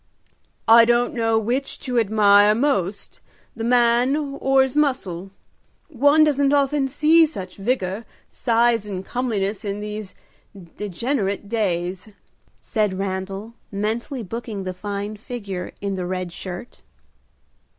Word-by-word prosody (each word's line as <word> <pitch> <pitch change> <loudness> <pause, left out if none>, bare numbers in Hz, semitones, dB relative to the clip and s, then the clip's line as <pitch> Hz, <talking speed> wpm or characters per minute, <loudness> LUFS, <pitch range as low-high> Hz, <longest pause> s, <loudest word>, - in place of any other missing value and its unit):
"I 230 +1 +9
don't 240 +1 +2
know 225 -2 +1
which 245 +5 -1
to 250 -4 0
admire 210 -1 +5
most, 215 -7 -1 0.3
the 225 - -5
man 240 +2 +3
or 275 -2 +2
his 265 0 -3
muscle. 200 - 0 0.6
One 290 +2 +4
doesn't 285 -2 +2
often 285 -1 +2
see 310 +4 +4
such 195 - -4
vigor, 200 -1 -2 0.2
size 230 -2 +1
and 190 -2 -5
comeliness 215 -5 -2
in 200 -1 -3
these 210 -2 -6 0.6
degenerate 205 0 -2
days," 190 -3 -2 0.5
said 210 -4 -1
Randal, 195 +3 -4 0.2
mentally 225 +6 -2
booking 220 -1 -5
the 185 0 -4
fine 205 +2 -5
figure 200 -5 -6
in 200 -1 -2
the 180 -2 -3
red 185 -1 -4
shirt. 185 +3 -8
220 Hz, 120 wpm, -22 LUFS, 195-250 Hz, 0.6 s, I